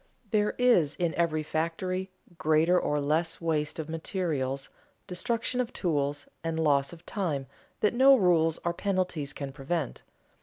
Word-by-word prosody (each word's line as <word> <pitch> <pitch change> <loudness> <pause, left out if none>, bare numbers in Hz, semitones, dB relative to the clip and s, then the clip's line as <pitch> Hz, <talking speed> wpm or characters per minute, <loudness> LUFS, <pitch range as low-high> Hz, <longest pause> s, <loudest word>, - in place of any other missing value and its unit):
There 210 -1 +2
is, 180 - +4
in 170 -2 0
every 160 -2 +1
factory, 185 +5 -2 0.3
greater 160 +3 +3
or 150 - 0
less 160 +3 +1
waste 155 -3 -1
of 160 -2 -4
materials, 155 -5 -2 0.4
destruction 230 +6 -1
of 250 0 -4
tools, 145 -4 -1 0.2
and 165 -1 -2
loss 140 -3 +2
of 170 0 -13
time, 160 -9 -2 0.4
that 210 - +3
no 265 +3 +7
rules 170 -7 +3
or 170 - +1
penalties 180 -7 -1
can 140 -1 -6
prevent. 145 +1 -3
165 Hz, 145 wpm, -28 LUFS, 150-185 Hz, 0.4 s, no